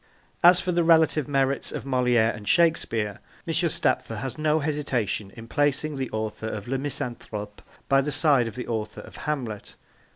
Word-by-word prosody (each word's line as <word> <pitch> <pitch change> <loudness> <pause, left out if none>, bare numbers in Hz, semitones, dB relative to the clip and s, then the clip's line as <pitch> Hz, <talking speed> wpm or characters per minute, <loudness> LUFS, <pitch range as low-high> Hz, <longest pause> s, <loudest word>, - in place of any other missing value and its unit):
As 175 +1 +7
for 180 - -1
the 175 -1 +2
relative 160 -3 +4
merits 135 -1 0
of - - -5
Moliere 125 -4 +2
and 105 -2 -10
Shakespeare, 115 - +2 0.3
M. - - -1
Stapfer - - 0
has 135 -1 -4
no 155 0 +1
hesitation 135 -9 -2
in 115 0 -10
placing 145 +3 0
the 130 -2 -3
author 110 0 -4
of 105 -1 -5
Le 135 +1 -1
Misanthrope 120 -7 -5 0.3
by 135 0 +4
the 150 +2 -2
side 140 -4 +3
of 115 - -7
the 125 - -5
author 110 -2 -4
of - - -13
Hamlet. 125 -9 -4
135 Hz, 170 wpm, -25 LUFS, 110-150 Hz, 0.3 s, As